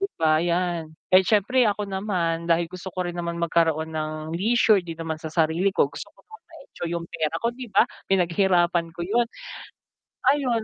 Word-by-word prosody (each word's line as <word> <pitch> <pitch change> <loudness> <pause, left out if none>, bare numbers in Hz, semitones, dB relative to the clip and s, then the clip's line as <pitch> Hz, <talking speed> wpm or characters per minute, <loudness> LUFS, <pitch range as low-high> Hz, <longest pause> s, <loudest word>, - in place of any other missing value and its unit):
'Di 395 - +1
ba, 155 0 +3
yan. 175 -2 -1 0.2
Eh, 185 - +8
siyempre 215 +6 +2
ako 205 0 -3
naman, 180 -4 -2
dahil 170 0 +3
gusto 185 +2 -8
ko 180 0 -3
rin 175 - -5
naman 170 -1 -4
magkaroon 160 -1 +1
ng 155 0 -2 0.2
leisure 215 +1 +3
din 165 -2 -8
naman 160 -1 -4
sa 160 - -5
sarili 165 +4 +1
ko, - - +2
gusto - - -9
ko - - -36
naman 440 0 -14
na - - -65
ma-enjoy 275 - -8
yung 170 - -8
pera 160 -1 -2
ko 230 - 0
'di 255 0 -7
ba, - - +5 0.3
pinaghirapan 175 -2 +2
ko 165 - -11
yun. 235 +5 +2 1.1
Ayun 255 -6 0
175 Hz, 190 wpm, -24 LUFS, 165-200 Hz, 1.1 s, Eh